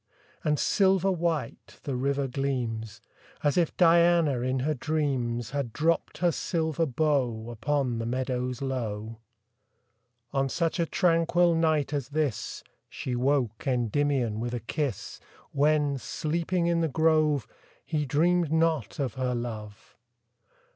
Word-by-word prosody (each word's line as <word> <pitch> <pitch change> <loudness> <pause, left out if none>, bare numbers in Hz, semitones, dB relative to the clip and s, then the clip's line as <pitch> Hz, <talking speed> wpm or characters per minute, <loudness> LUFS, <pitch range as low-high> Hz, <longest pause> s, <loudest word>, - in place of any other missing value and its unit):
And 150 -1 +1
silver 195 +1 +3
white 165 -8 -3
the 140 - -3
river 140 +2 0
gleams, 120 -5 -3 0.4
As 145 -1 +2
if 170 -3 +1
Diana, 170 -5 +4
in 130 +1 -1
her 155 +4 +1
dreams, 130 -6 -1
Had 140 -4 -2
dropt 165 +2 0
her 175 -1 +2
silver 160 -1 -1
bow 125 -5 0
Upon 120 +1 -1
the 115 - -3
meadows 125 0 -2
low. 115 -4 -4 1.1
On 135 0 +1
such 165 +4 -1
a 170 - +1
tranquil 170 0 +3
night 155 -3 +1
as 140 -3 -2
this, 150 -6 -2 0.3
She 125 - -4
woke 125 -2 0
Endymion 125 -2 +1
with 120 +1 -3
a - - -2
kiss, 135 - -4 0.3
When, 145 -1 +2
sleeping 170 +6 -1
in 170 -1 +2
the 165 - +2
grove, 155 -3 +2 0.4
He 150 -3 -1
dreamed 170 +3 +2
not 160 -7 +1
of 135 -5 -2
her 130 -1 -1
love. 110 -3 -7
140 Hz, 130 wpm, -27 LUFS, 125-160 Hz, 1.1 s, Diana